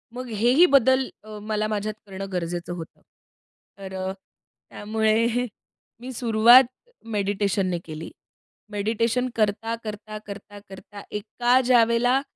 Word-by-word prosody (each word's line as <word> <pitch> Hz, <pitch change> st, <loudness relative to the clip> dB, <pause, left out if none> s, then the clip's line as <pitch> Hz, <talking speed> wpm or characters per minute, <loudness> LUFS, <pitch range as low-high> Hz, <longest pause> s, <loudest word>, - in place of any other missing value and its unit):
मग 255 Hz, 0 st, -6 dB
हेही 240 Hz, -, +4 dB
बदल 265 Hz, -4 st, +4 dB, 0.2 s
अ, 215 Hz, 0 st, -9 dB
मला 215 Hz, 0 st, -1 dB
माझ्यात 215 Hz, 0 st, -2 dB
करणं 195 Hz, 0 st, -7 dB
गरजेचं 175 Hz, 0 st, -3 dB
होतं. 165 Hz, -2 st, -9 dB, 0.8 s
तर 190 Hz, -1 st, -9 dB
अ, 190 Hz, 0 st, -3 dB
त्यामुळे 220 Hz, +4 st, -2 dB, 0.5 s
मी 255 Hz, +2 st, -6 dB
सुरुवात 235 Hz, +2 st, +6 dB, 0.5 s
मेडिटेशनने 200 Hz, -2 st, 0 dB
केली. 155 Hz, 0 st, -8 dB, 0.6 s
मेडिटेशन 230 Hz, +4 st, 0 dB
करता, 225 Hz, +1 st, 0 dB
करता, 215 Hz, 0 st, -7 dB
करता, 205 Hz, 0 st, -9 dB
करता, 200 Hz, +1 st, -11 dB
एका 240 Hz, +4 st, +1 dB
ज्यावेळेला 245 Hz, +1 st, +4 dB
215 Hz, 110 wpm, -24 LUFS, 200-240 Hz, 0.8 s, सुरुवात